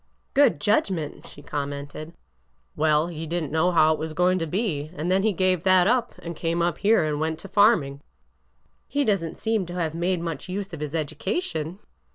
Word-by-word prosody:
''Good 280 - +4
judgment!" 170 -3 0
she 145 - -13
coijnmented. 145 +2 -5 0.3
" 60 0 -44
Well, 155 0 +3
he 165 -1 -6
did 170 +1 -1
n't 150 - -6
know 160 +3 +2
how 160 -3 +4
it - - -5
was 160 0 -4
going 180 +2 +2
to 165 - -2
be, 175 -5 -1
— - - -17
and 170 +4 -1
then 190 +1 +3
he 220 +2 +2
gave 185 -2 +1
that 185 -1 +5
up 240 +3 +1
and 170 0 -5
came 165 +2 -1
up 170 0 0
here 215 -2 +4
and 150 -1 -1
went 160 0 -1
to - - -9
farming." 190 -10 +3 0.5
" - - -42
He 285 0 0
does 200 -6 +2
n't 165 - -6
seem 220 -5 -1
to 175 - -7
have 165 -3 -1
made 175 +2 0
much 165 -1 -5
use 195 0 -4
of 165 - -6
his 150 +1 -4
edu 155 -1 -2
cation." 175 - -2
165 Hz, 220 wpm, -25 LUFS, 155-190 Hz, 0.5 s, that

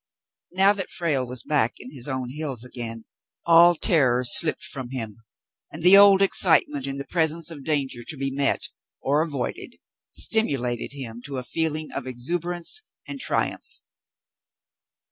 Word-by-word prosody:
Now 195 +3 +3
that 195 -3 -6
Frale 145 -7 -2
was 125 0 -5
back 140 -7 0
in 125 - -12
his 130 -2 -2
own 130 -2 -4
hills 140 -5 -4
again, 115 -3 -7 0.4
all 170 +1 +6
terror 130 -7 +1
slipped 155 +5 +6
from 130 -3 -7
him, 115 -5 -6 0.5
and 160 - -10
the 180 +2 +8
old 200 -1 +7
excitement 155 -7 +2
in 135 0 -5
the 140 - -7
presence 165 0 0
of 145 -4 -10
danger 135 -5 -2
to 145 +5 -4
be 135 0 -3
met, 140 +1 -1 0.3
or 145 +3 0
avoided, 145 -6 -5 0.4
stimulated 135 - +1
him 120 -4 -8
to 140 -2 -6
a 125 - -4
feeling 155 +3 -2
of 130 - -6
exuberance 170 - -2 0.3
and 280 - -8
triumph. - - -3
140 Hz, 150 wpm, -23 LUFS, 125-165 Hz, 0.5 s, the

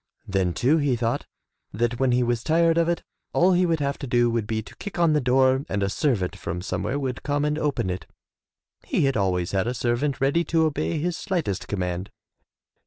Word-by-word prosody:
Then 95 -3 0
too 140 +6 +3
he 145 -5 +1
thought 115 0 -1 0.4
that 120 +3 -1
when 135 -1 +3
he 125 0 +3
was 120 -1 0
tired 165 +1 +3
of 165 0 +2
it, 170 - -1 0.3
all 180 +2 +4
he 180 0 +3
would 165 -2 +1
have 140 0 -1
to 140 - -5
do 120 -1 +3
would 115 -3 -1
be 110 0 -2
to - - -14
kick 205 - -7
on 170 -2 +4
the 150 - +2
door 130 +1 +3
and 100 0 -1
a 100 - +1
servant 105 - 0
from 90 +1 -5
somewhere 130 +7 -2
would 130 -4 -3
come 145 0 0
and 150 +1 0
open 140 -10 0
it, 90 - -6 0.4
— - - -35
^he - - +2
had 135 -1 +2
always 90 -4 0
had 95 +2 0
a 125 - -1
servant 125 +4 0
ready 140 +6 +2
to 160 -1 +2
obey 85 - -1
his 175 +3 -1
slightest 170 - -2
command. 90 -1 -3
125 Hz, 220 wpm, -25 LUFS, 105-150 Hz, 0.4 s, all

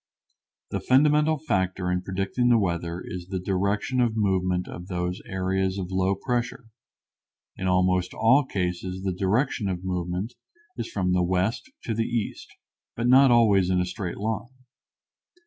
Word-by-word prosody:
The - - -1
fundamental 150 +4 +3
factor 95 - -1
in 90 0 0
predicting 95 +7 -1
the 120 - +6
weather 85 -3 -2
is 90 -1 -7
the 95 0 -3
direction 100 +7 0
of 115 -2 +1
movement 95 -3 +1
of 90 +1 -8
these 90 -1 -3
areas 95 0 -1
of 95 -1 -4
low 95 +1 +1
pressure. 120 +2 -3 0.9
In 95 - -3
almost 90 0 +2
all 130 +6 +4
cases 90 -4 -3
the 95 -1 -1
direction 100 +3 0
of 90 -1 -4
movement 90 +4 -3 0.4
is - - -4
from 90 -2 0
the 90 - +3
west 95 - 0
to 115 - -2
the 115 +1 -1
east, 120 -3 -3 0.5
but 115 - -2
not 130 +2 +7
always 105 -6 +4
in 90 -1 +2
a 90 - +1
straight 90 -1 -5
line. 110 +5 -4
95 Hz, 155 wpm, -25 LUFS, 90-115 Hz, 0.9 s, not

